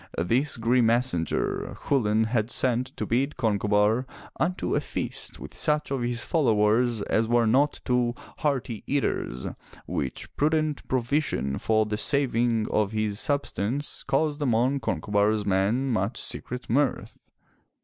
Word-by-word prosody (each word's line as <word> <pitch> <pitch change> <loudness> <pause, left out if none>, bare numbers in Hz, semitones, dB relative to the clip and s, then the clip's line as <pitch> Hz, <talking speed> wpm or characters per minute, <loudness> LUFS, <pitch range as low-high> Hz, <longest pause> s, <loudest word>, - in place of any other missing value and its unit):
This 125 - +1
grim 120 +1 +3
messenger, 115 -8 0
Chulain 110 -5 +2
had 110 0 0
sent 125 0 +1
to 110 - -2
bid 130 +7 0
Concobar 105 +1 +2 0.3
unto 180 +3 0
a - - +2
feast - - -5
with - - -9
such 150 -1 0
of 135 -2 -1
his 120 -1 -1
followers 115 -5 +2
as 110 +2 +1
were 120 0 +3
not 135 +7 +2
too 125 -1 +1 0.2
hearty 135 -6 -1
eaters, 130 - -1 0.4
which 65 - -4
prudent 155 0 0
provision 125 - 0
for 110 -1 +2
the 105 0 -2
saving 120 -4 +1
of 105 0 +1
his 110 -1 -1
substance 140 -1 -2
caused 155 -1 0
among 130 +1 +2
Conco 120 - -3
bar*s 105 +1 +2
men 100 +8 +1
much 110 +1 -1
secret 125 0 -4
mirth. 135 +4 0
120 Hz, 135 wpm, -26 LUFS, 110-135 Hz, 0.4 s, grim